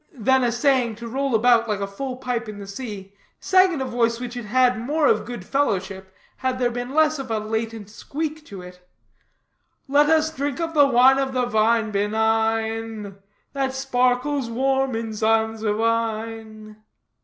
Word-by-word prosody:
Then 260 +3 +2
essaying 245 -1 +1
to 235 +2 -8
roll 270 +1 -1
about 230 0 +3
like 210 -1 -1
a 200 - -1
full 250 +7 -5
pipe 245 -3 -3
in 210 - -8
the 200 - -8
sea, 200 -2 -8 0.3
sang 375 0 +4
in 290 - -3
a - - -1
voice 235 -2 0
which 245 -1 -6
had 245 -2 -6
had 250 +2 +2
more 295 +5 0
of - - +2
good 240 -6 -7
fellowship, 190 -8 -2 0.3
had 260 -1 -2
there 245 -1 0
been 245 +3 -5
less 310 -1 +3
of 265 -2 -6
a 225 - 0
latent 220 0 -4
squeak 305 +8 -5
to 195 -3 -9
it: 180 0 -13 1.0
"Let 290 +2 +4
us 315 0 +2
drink 280 +1 -3
of 330 -1 -3
the 290 -2 +5
wine 260 +1 +5
of 265 -1 -1
the 250 -1 +1
vine 225 -1 +1
benign, 220 0 -1 0.4
That 270 -1 -2
sparkles 255 0 0
warm 265 +1 0
in 225 -1 -4
Zansovine." 220 0 -1
235 Hz, 165 wpm, -23 LUFS, 220-265 Hz, 1.0 s, the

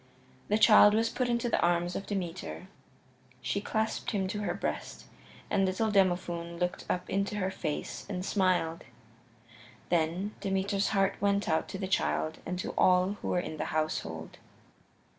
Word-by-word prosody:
The 210 - +2
child 210 -1 +7
was 225 +1 +2
put 250 -1 -1
into 235 0 +1
the 235 - +1
arms 175 0 +1
of 195 - -4
Demeter; 185 -1 -4 0.7
she 130 +11 -2
clasped 220 +1 -1
him 195 -4 0
to 210 - -3
her 205 - -1
breast, - - -4 0.4
and 200 -1 +2
little 190 +4 +1
Demophoon 175 -3 +1
looked 180 0 -2
up 180 0 -1
into 200 +1 -1
her 190 -2 -1
face 155 -5 -4
and 185 -2 -3
smiled. 185 -5 +1 1.1
Then 175 +5 0
Demeter's 195 0 0
heart 195 -1 +1
went 200 0 +2
out 160 - +1
to - - -5
the 190 -1 -3
child 75 - 0
and 180 +1 -2
to 185 - -3
all 185 +2 +3
who - - -4
were 180 - +1
in 160 -3 -5
the 155 - -2
household. 80 - -3
190 Hz, 160 wpm, -30 LUFS, 175-205 Hz, 1.1 s, child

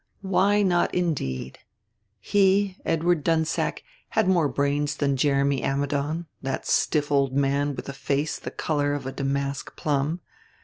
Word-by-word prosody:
Why 200 +2 +3
not 175 -3 +2
indeed! 125 - -2 0.6
He, 195 - +2
Edward 165 -1 +1
Dunsack, 160 0 0 0.3
had - - +1
more 175 -5 +3
brains 145 +1 0
than 140 -2 +1
Jeremy 140 0 +2
Ammidon, 145 +4 -1 0.2
that 135 0 -3
stiff 150 -2 +1
old 140 -2 +2
man 140 +1 +1
with - - -7
a 140 - -5
face 140 +2 -1
the - - -6
color 145 -2 -1
of 140 -2 -5
a 135 - -3
damask 140 0 -3
plum. 150 +3 -1
145 Hz, 140 wpm, -25 LUFS, 140-165 Hz, 0.6 s, Why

